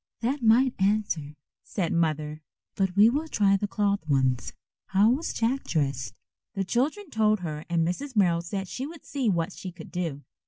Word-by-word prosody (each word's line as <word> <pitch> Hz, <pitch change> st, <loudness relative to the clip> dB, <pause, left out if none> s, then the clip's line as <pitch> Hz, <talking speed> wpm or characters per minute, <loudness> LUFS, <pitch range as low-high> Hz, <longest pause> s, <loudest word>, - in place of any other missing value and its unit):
"That 260 Hz, +4 st, -1 dB
might 240 Hz, +3 st, +5 dB
answer," 190 Hz, -7 st, 0 dB, 0.3 s
said 180 Hz, -5 st, -2 dB
Mother, 155 Hz, -2 st, 0 dB, 0.3 s
"but 190 Hz, -2 st, 0 dB
we 205 Hz, +2 st, +7 dB
will 290 Hz, +7 st, 0 dB
try 200 Hz, -8 st, +3 dB
the 205 Hz, +1 st, -1 dB
cloth 200 Hz, 0 st, +1 dB
ones. 130 Hz, -3 st, +1 dB, 0.4 s
How 200 Hz, +4 st, +4 dB
was 290 Hz, +7 st, -1 dB
Jack 245 Hz, +4 st, 0 dB
dressed?" 135 Hz, -, -1 dB, 0.4 s
The 195 Hz, -, 0 dB
children 290 Hz, -, -1 dB
told 215 Hz, -2 st, +2 dB
her 155 Hz, -3 st, -5 dB
and 165 Hz, -1 st, +2 dB
Mrs. 260 Hz, +9 st, -4 dB
Merrill 175 Hz, -5 st, +3 dB
said 190 Hz, +3 st, -4 dB
she 260 Hz, +9 st, -4 dB
would 325 Hz, 0 st, -11 dB
see 265 Hz, -6 st, -1 dB
what 170 Hz, -1 st, 0 dB
she 185 Hz, -, -7 dB
could 170 Hz, -2 st, -12 dB
do. 165 Hz, -6 st, -3 dB
195 Hz, 180 wpm, -27 LUFS, 165-230 Hz, 0.4 s, we